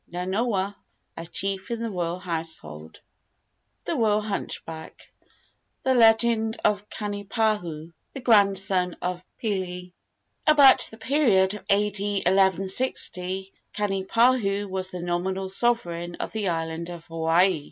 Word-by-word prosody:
Nanoa, 195 +3 -1 0.4
a 165 - -7
chief 195 +2 -3
in 235 -1 -3
the 230 -1 -3
royal 175 -2 -2
household. 160 - -7 0.8
THE - - -1
ROYAL 215 -2 +2
HUNCHBACK. 165 -6 -6 0.8
THE 260 - +2
LEGEND 225 -1 +3
OF 210 0 +1
KANIPAHU, 205 -6 -2 0.2
THE 275 - -6
GRANDSON 195 -6 +3
OF 180 0 -4
PILI. 180 -4 -4 0.5
I. - - +8
About 280 -3 +7
the 220 - -13
period 220 -8 +2
of 210 - -8
A.D. 205 0 +1
1160 190 0 +1 0.2
Kanipahu 205 +1 +1
was 190 -1 -2
the 180 -2 -6
nominal 185 +2 -2
sovereign 175 -6 0
of - - -5
the 210 -4 -2
island 165 0 -3
of 170 -2 -9
Hawaii. 165 +2 +2
195 Hz, 120 wpm, -25 LUFS, 175-215 Hz, 0.8 s, I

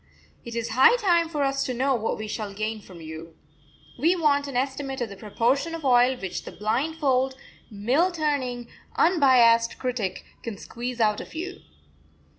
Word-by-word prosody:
It 235 -1 -8
is 230 0 -2
high 260 - +6
time 345 -7 +2
for 300 -3 -1
us 275 0 0
to 255 - -3
know 265 +3 +1
what 225 -3 -1
we 215 - -5
shall 210 -2 -5
gain 215 +1 -3
from 180 -4 -13
you. 160 +1 -9 0.6
We 335 +7 +3
want 285 -4 +2
an 270 -3 -3
estimate 270 +1 -2
of 240 -3 -2
the 200 - -9
proportion 245 +10 0
of 320 -3 -7
oil 250 0 +4
which 190 -6 -5
the - - -8
blindfold, 265 - 0 0.3
mill 245 - +1
turning, 275 -7 -2 0.3
unbiased 250 -9 +4
critic 240 -8 -3 0.2
can 225 -4 -6
squeeze 245 +4 -6
out 210 -2 +2
of - - -12
you." 370 +4 -6
250 Hz, 170 wpm, -25 LUFS, 225-285 Hz, 0.6 s, high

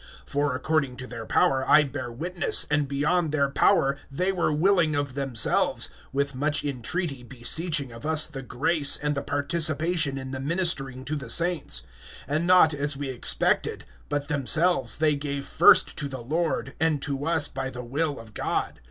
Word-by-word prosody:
(3)For 145 -2 -1
according 140 -2 -1
to 125 - -6
their 115 -3 -8
power, 135 -1 +2
I 155 - +6
bear 130 -3 -6
witness, 170 +7 0
and 150 -1 +1
beyond 150 +4 0
their 140 -2 0
power, 140 -5 +2
they 180 +8 -1
were 175 -4 0
willing 165 0 +2
of 145 -2 -2
themselves; 135 -4 +1 0.2
(4)with 140 0 -1
much 145 +2 -1
entreaty 140 +2 -3
beseeching 135 +4 -2
of 115 +2 -11
us 155 0 +2
the 135 -3 -8
grace, 145 +3 +1
and 150 0 -2
the 140 - -3
participation 155 +1 +2
in 130 -1 -7
the 130 - -5
ministering 135 -4 -1
to 155 - -3
the 140 -5 -6
saints; 150 - +1 0.4
(5)and 150 +4 -1
not 180 -3 +5
as 145 0 -2
we 140 -1 -4
expected, 125 - +2 0.2
but 145 -1 -2
themselves 160 +5 +1
they 155 -1 +2
gave 140 -1 -4
first - - +5
to 145 - -2
the 130 -3 -7
Lord, 150 -1 -2
and 160 -2 +1
to 140 +1 -3
us 165 -2 +1
by 135 -1 -5
the 125 -1 -8
will 145 +3 -2
of 110 -2 -13
God. - - -3
145 Hz, 175 wpm, -25 LUFS, 135-160 Hz, 0.4 s, I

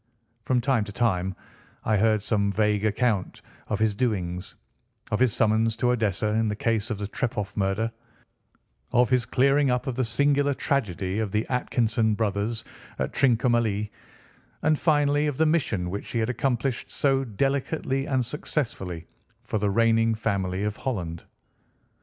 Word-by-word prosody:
From 125 -1 +2
time 125 -3 +2
to 105 - -8
time 95 -4 0 0.5
I 110 - +2
heard 110 0 +2
some 100 -2 +1
vague 105 0 +1
account 110 -2 0 0.2
of 105 - -1
his 110 0 +2
doings: 95 -6 -2 0.6
of 105 - +1
his 130 -2 +4
summons 110 +1 +2
to 125 +1 +1
Odessa 110 -3 0
in 110 +1 +1
the 105 - -1
case 110 0 0
of 110 - -2
the 100 0 -4
Trepoff 105 -2 -3
murder, 100 +3 0 1.0
of 125 +1 +3
his 125 -1 +2
clearing 135 +3 +3
up 125 +2 0
of 130 - -2
the 130 +2 0
singular 140 +4 +2
tragedy 100 - -1
of 110 -3 -2
the 105 +2 0
Atkinson 115 -3 +1
brothers 105 +1 -1 0.3
at - - -2
Trincomalee, 115 -5 +2 0.7
and 155 -1 +3
finally 145 -1 +2
of 145 -3 -2
the 160 - +3
mission 110 - 0
which 100 - -5
he - - -3
had 115 +2 +1
accomplished 125 0 -1
so 135 -1 +1
delicately 135 +3 -1
and 130 -3 +1
successfully 110 - -3 0.4
for 110 -1 -2
the 105 0 +1
reigning 115 +1 +3
family 95 -3 -1
of 105 0 -2
Holland. 85 -10 -4
115 Hz, 155 wpm, -26 LUFS, 105-130 Hz, 1.0 s, his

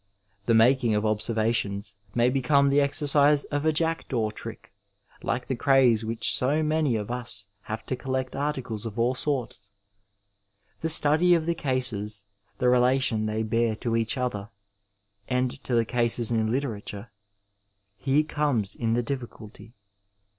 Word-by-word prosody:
The 115 - +4
making 120 0 +4
of 105 +1 0
observations, 110 -2 -1 0.2
may 120 +1 +3
become 140 +1 +3
the 140 +1 +3
exercise 145 0 +3
of 145 +1 -1
a 160 - +4
jackdaw 150 -8 0
trick, - - -10 0.5
like 125 - -2
the 130 - -2
craze 125 -4 +3
which 110 +1 +1
so 145 +5 +1
many 155 -4 +1
of 105 +1 -3
us 120 -5 -5 0.2
have 110 +1 -4
to 130 - -2
collect 130 0 -3
articles 130 -6 -3
of 110 - -8
all 120 +2 +2
sorts. 130 -5 -2 1.2
The 160 - -2
study 160 +3 +4
of 160 -2 -1
the 170 - +1
cases, 115 -9 -2 0.3
the 125 - +1
relation 125 -3 +2
they 110 +1 -1
bear 115 0 0
to 115 +1 -2
each 115 +5 0
other 105 -5 -3 0.8
and 125 -1 0
to 125 - 0
the 115 -1 +3
cases 120 0 +1
in 110 -1 +1
hterature 110 -4 -4 0.5
— 100 +1 -41
^here 145 +3 +2
comes 140 -11 -1
in 115 -1 0
the 120 - 0
difficulty. 115 -3 -8
120 Hz, 150 wpm, -26 LUFS, 110-140 Hz, 1.2 s, The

